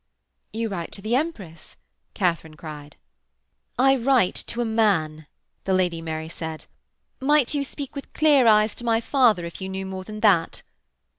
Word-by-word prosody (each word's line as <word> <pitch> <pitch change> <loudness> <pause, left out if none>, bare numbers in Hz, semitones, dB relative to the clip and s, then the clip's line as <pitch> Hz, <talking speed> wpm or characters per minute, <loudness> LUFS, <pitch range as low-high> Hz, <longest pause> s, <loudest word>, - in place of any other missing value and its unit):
'You 225 +1 -2
write 175 -5 -5
to 195 - -9
the 225 +3 0
Empress,' 205 - -4 0.4
Katharine 165 -4 -1
cried. 150 -2 -10 0.8
'I 270 +2 +4
write 245 -6 +3
to 235 - -3
a 240 - +1
man,' 170 -9 +1 0.4
the 190 - +2
Lady 175 -3 0
Mary 160 -1 -4
said. 160 -1 -7 0.5
'Might 290 -1 +2
you 285 -1 0
speak 280 0 -7
with 280 - -8
clear 290 -5 +4
eyes 215 -1 +5
to - - -5
my 230 -1 +2
father 230 -8 +2
if 170 +3 -9
you 190 - -4
knew 190 0 -4
more 190 0 -6
than 215 +2 -8
that?' 190 -7 +2
205 Hz, 165 wpm, -24 LUFS, 165-245 Hz, 0.8 s, eyes